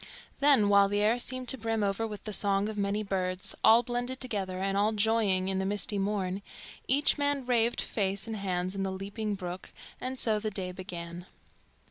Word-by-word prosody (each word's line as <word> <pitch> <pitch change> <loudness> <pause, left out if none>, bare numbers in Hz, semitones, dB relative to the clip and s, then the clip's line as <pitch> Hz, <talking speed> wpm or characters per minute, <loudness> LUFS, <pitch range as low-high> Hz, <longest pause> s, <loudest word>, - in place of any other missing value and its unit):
Then, 275 -7 +5
while 200 0 +5
the 205 0 0
air 225 +3 +3
seemed 255 +1 -2
to 265 - +3
brim 225 -1 -1
over 200 +3 -1
with 210 -2 -8
the 215 - -4
song 200 0 +3
of 220 - -5
many 205 +1 -1
birds, 185 -2 -1
all 230 +2 +7
blended 245 +2 -3
together 200 -7 -3
and 195 +1 -1
all 210 +2 +2
joying 205 -3 +2
in 190 0 -1
the - - -1
misty 205 +1 0
morn, 195 -1 -2 0.5
each 285 +3 +3
man 285 -2 +1
raved 240 -1 +2
face 195 -1 -1
and 225 -1 -5
hands 185 -2 -2
in 195 - -4
the 195 0 -1
leaping 200 +2 -4
brook, 180 -1 -7 0.3
and 260 +1 -4
so 220 -4 +2
the 215 0 -2
day 190 -3 -4
began. 175 -1 -7
205 Hz, 195 wpm, -29 LUFS, 190-225 Hz, 0.5 s, all